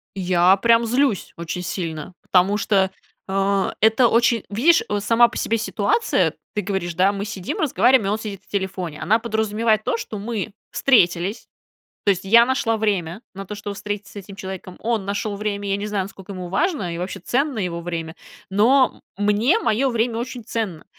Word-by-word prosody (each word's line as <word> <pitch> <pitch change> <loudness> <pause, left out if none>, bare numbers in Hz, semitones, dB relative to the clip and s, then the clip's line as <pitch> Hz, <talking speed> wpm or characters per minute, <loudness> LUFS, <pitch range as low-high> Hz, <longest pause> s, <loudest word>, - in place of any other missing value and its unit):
Я 180 -1 +4
прям 230 +3 +4
злюсь 245 -2 0
очень 170 +2 -4
сильно, 170 -1 -5
потому 190 +3 +2
что, 195 -3 +2 0.4
а, 195 0 0
это 225 +3 +5
очень, 235 -1 +2
видишь, 275 +12 +4
вот 205 -1 -1
сама 230 +3 +5
по 230 - -8
себе 230 - 0
ситуация. 225 - +1 0.2
Ты 210 - -1
говоришь, 190 -3 -3
да, 185 +3 +4
мы 200 0 -4
сидим, 195 -4 -5
разговариваем, 260 -6 +3
и - - +1
он 215 - -1
сидит 205 -3 -6
в - - -34
телефоне, 185 -5 -4
она 210 +8 +3
подразумевает 220 -1 0
то, - - 0
что 215 - -6
мы 210 0 -4 0.2
встретились. 195 -4 +2 0.6
То 205 - +4
есть, 190 -2 0
я 230 +4 +7
нашла 260 -3 0
время 200 -3 -1
на 195 +1 -7
то 210 - -6
чтобы 205 0 -6
встретиться 205 -1 -6
с - - -17
этим 200 0 -9
человеком, 190 -2 -7
он 225 -4 -1
нашел 205 +1 -2
время. 205 -1 -3
Я 195 - +1
не 205 - -4
знаю, 205 -2 -1
насколько 195 0 -10
ему 180 -2 -6
важно, 200 - -1
и - - -5
вообще 180 +2 -4
ценно 265 - -1
его 175 -4 -2
время, 165 -1 -5 0.4
но, 245 +7 +3 0.2
м, 205 - -1
мне 220 - +3
мое 270 - +1
время 235 -1 0
очень 245 0 -5
ценно. 205 -9 -4
205 Hz, 190 wpm, -22 LUFS, 190-230 Hz, 0.6 s, я